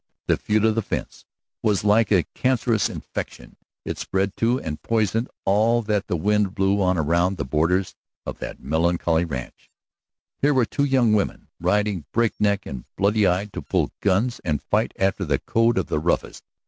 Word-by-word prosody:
The - - +3
feud 110 +1 +1
of 110 - +3
the 115 - 0
fence - - -5 0.4
was 105 -4 +1
like 105 +2 +3
a 95 -5 +4
cancerous 125 -4 +1
infection. - - -7 0.3
It - - -4
spread 95 +1 -1
to 120 +3 +2
and 75 - -5
poisoned 115 +1 0 0.2
all 110 +4 +3
that 105 -2 -1
the 90 - -1
wind 105 +2 +1
blew 100 +1 +2
on 90 -1 +2
around 85 +4 +1
the 70 - -3
borders 85 +7 +1 0.3
of - - -6
that - - -6
melancholy 85 +2 +1
ranch. 65 -6 -7 0.7
Here 145 0 +3
were 125 -3 +4
these 140 +5 -1
two 125 -4 +3
women 100 - -2
riding 95 -1 0
break 115 -1 +2
neck 100 -1 +1
and 65 -3 -7
bloody 105 +1 +2
eyed 95 +3 -1
to - - -5
pull - - -1
guns 105 +5 +1
and 75 -4 0
fight - - 0
after 95 -1 0
the - - +1
code 115 +1 +1
of - - +1
the - - -1
roughest. 85 +3 -2
100 Hz, 180 wpm, -23 LUFS, 90-110 Hz, 0.7 s, a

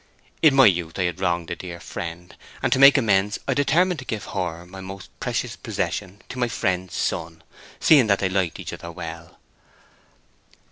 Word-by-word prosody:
In 155 -4 +6
my 135 -1 +8
youth 85 -4 +2
I 95 - +1
had 85 -2 -2
wronged 85 0 -1
my - - 0
dead 85 -1 -8
friend, 85 +1 -7 0.3
and - - +3
to 130 - +1
make 140 +1 +9
amends 105 -5 +2
I 135 - +2
determined 160 +6 +2
to 130 - -8
give 110 -4 -4
her, 90 -3 -4
my 95 +2 -10
most 95 0 -9
precious - - -2
possession, 100 0 -4
to 130 - -6
my 120 - +2
friend's 95 -4 -2
son, 80 0 -3 0.4
seeing 140 -7 +6
that 100 -1 +4
they 95 - 0
liked 95 -3 -1
each - - -6
other 85 - -8
well. 85 -1 -8
95 Hz, 185 wpm, -23 LUFS, 85-120 Hz, 0.4 s, make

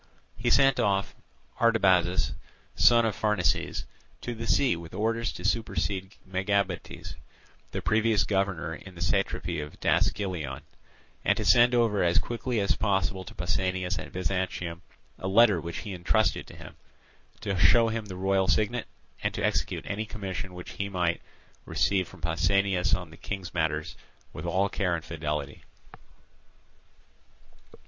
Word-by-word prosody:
He 120 +2 -1
sent 135 +1 +5
off 100 -4 +1 0.5
Artabazus, 95 -6 +3 0.4
son 120 -1 +5
of 110 - 0
Pharnaces, 105 -7 0 0.4
to 120 - -4
the 115 0 -6
sea 135 -9 +3
with 85 0 -9
orders 115 +3 0
to 90 - -8
supersede 100 -3 -1
Megabates, 100 +2 -2 0.6
the - - -5
previous 110 -2 +3
governor 95 -4 -1
in 95 +3 -11
the 85 - -10
satrapy 90 -2 0
of 75 0 -9
Daskylion, 95 -6 0 0.6
and - - +3
to - - -2
send 120 +1 +6
over 115 -4 +2
as 85 0 +3
quickly 120 0 -1
as 100 - +2
possible 95 -2 0
to - - -11
Pausanias 95 +1 -1
at - - -8
Byzantium 90 -2 -2 0.4
a 95 - -4
letter 100 -3 +5
which 85 0 -5
he 105 -3 -6
entrusted 100 +5 +1
to - - -12
him; - - -12 0.6
to 100 -3 -1
show 115 +5 +5
him 110 -1 -3
the 95 -3 -7
royal 95 0 +2
signet, 115 +2 +1 0.3
and - - -1
to - - 0
execute - - -1
any 105 +2 -3
commission 95 -3 -5
which 90 - -8
he 100 0 -4
might 90 -3 0 0.4
receive 95 -3 +1
from 95 - -15
Pausanias 90 +2 +2
on 90 -3 -7
the 80 - -13
King's 95 -2 -6
matters 80 -2 -1 0.4
with - - -6
all 95 +2 +2
care 95 -3 0
and 80 - -6
fidelity. 75 -2 -4
95 Hz, 145 wpm, -28 LUFS, 90-110 Hz, 0.6 s, send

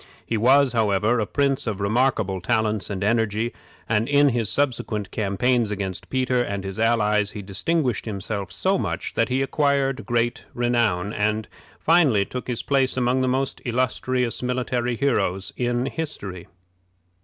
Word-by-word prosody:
He 115 - -2
was, 130 +4 +4
however, 110 +1 +2
a 105 - -1
prince 140 0 0
of 105 -3 -2
remarkable 105 -3 +1
talents 110 -2 0
and 100 -1 -3
energy, 110 +1 +1 0.3
and 110 +2 +1
in 145 0 +5
his 115 -4 0
subsequent 115 -7 -1
campaigns 115 +3 +1
against 95 -3 -4
Peter 130 -1 +1
and 100 -5 -3
his 95 +2 -6
allies 105 -2 +2
he 105 - -6
distinguished 125 - -1
himself 100 -2 -4
so 190 - +1
much - - -3
that 115 - +1
he 130 +2 +1
acquired 135 -5 0
great 120 +1 0
renown, 115 -6 +1
and 110 +1 0 0.3
finally 150 - +4
took 125 +5 -6
his 125 -2 -3
place 135 -2 +2
among 125 +1 +2
the 130 - +1
most 130 +1 -1
illustrious 125 0 -1
military 125 -1 -1
heroes 95 -8 0
in 120 0 0
history. 105 - -4
115 Hz, 150 wpm, -23 LUFS, 105-130 Hz, 0.3 s, in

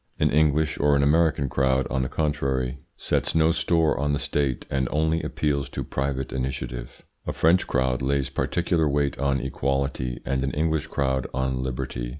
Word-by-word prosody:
An - - +2
English 75 0 +2
or 75 0 +4
an 70 - +3
American 75 -1 +3
crowd, 65 0 +1
on 65 0 +1
the 65 - -2
contrary, 70 -4 -1 0.2
sets - - -1
no 80 0 +4
store 80 -2 +2
on 70 0 0
the - - +1
State, 70 -3 -1
and 65 -1 0
only 80 +2 +1
appeals 70 -2 -1
to - - -4
private 70 -1 -3
initiative. 65 -2 -4 0.2
A - - -1
French 85 +3 +3
crowd 65 -1 0
lays 70 0 0
particular 80 +1 0
weight 70 -1 0
on 70 0 +1
equality 70 -1 -2
and 65 -1 0
an 70 - -2
English 80 0 0
crowd 65 -2 -1
on 65 -1 -1
liberty. - - -4
70 Hz, 170 wpm, -25 LUFS, 65-75 Hz, 0.2 s, or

